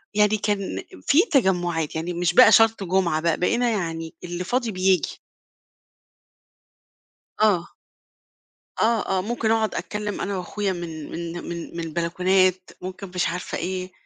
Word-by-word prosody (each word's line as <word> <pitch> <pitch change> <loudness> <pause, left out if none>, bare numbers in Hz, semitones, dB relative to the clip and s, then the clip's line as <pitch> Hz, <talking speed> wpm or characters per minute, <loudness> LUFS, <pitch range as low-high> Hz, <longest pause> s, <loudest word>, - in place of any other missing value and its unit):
يعني 210 0 +4
كان 205 -1 -2 0.2
في 300 +5 +6
تجمّعات 175 - +1
يعني 170 +2 -3
مش 175 0 0
بقى 255 - +9
شرط 225 -3 +5
جمعة 175 -4 +1
بقى 165 -1 +1
بقينا 235 +6 +2
يعني 165 -5 -3
اللي 175 +1 -4
فاضي 240 +3 -1
بييجي. 185 -1 +1 2.2
آه. 195 -6 +3 1.1
آه، 220 -4 +2
آه، - - +1
ممكن 225 +1 -1
أقعد 220 -1 +1
أتكلّم 210 -1 -4
أنا 200 -1 -2
وأخويا 195 +2 -2
من 165 -3 -7
من 170 0 -5 0.2
من 170 0 -6
من - - -3
البلكونات، 185 +3 +1
ممكن 185 +1 -7
مش 180 - +1
عارفة 180 +2 -4
إيه، 185 +1 -4
185 Hz, 135 wpm, -24 LUFS, 170-210 Hz, 2.2 s, بقى